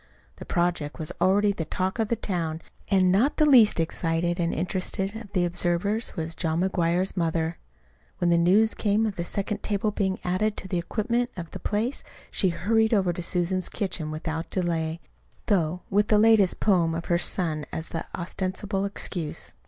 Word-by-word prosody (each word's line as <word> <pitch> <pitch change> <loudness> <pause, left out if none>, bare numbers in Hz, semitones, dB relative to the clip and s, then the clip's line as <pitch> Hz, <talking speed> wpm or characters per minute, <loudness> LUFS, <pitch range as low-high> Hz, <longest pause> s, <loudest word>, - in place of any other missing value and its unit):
The - - -9
project 170 -4 -1
was 155 -3 -3
already 205 +2 +4
the 185 -5 -3
talk 185 +6 -2
of 220 - +1
the 235 - +1
town, 165 -7 -3 0.3
and 185 -2 +4
not 230 +10 +2
the 305 - +5
least 240 - +6
excited 165 +1 0
and 170 -1 +1
interested 190 +3 -2
of 220 -3 -8
the 180 -3 +2
observers 175 +6 -1
was 165 -2 -3
John 165 0 -1
McGuire's 180 0 +1
mother. 165 -2 -1 0.6
When 175 -1 +1
the 170 - +4
news 200 +6 +4
came 210 +1 +1
of 210 -3 -2
the 170 - -3
second 200 +4 -3
table's 210 0 -1
being 190 -2 0
added 205 +4 0
to - - -6
the 180 -2 -1
equipment 235 +7 -1
of 170 -2 -6
the - - -7
place, 225 +6 -1 0.3
she 190 - +2
hurried 220 +6 +2
over 190 -4 +2
to 175 - -5
Susan's 180 +1 0
kitchen 180 -7 -3
without 160 +1 -4
delay 165 -2 -1 0.4
though 180 -3 0
with 205 +1 +3
the 215 - +4
latest 215 -3 +4
poem 170 -5 +2
of 165 - -4
her 175 -1 +1
son's 160 -4 -1
as 160 - -3
the 165 - -3
ostensible 190 +3 -2
excuse. 175 -5 -3
185 Hz, 180 wpm, -26 LUFS, 170-205 Hz, 0.6 s, least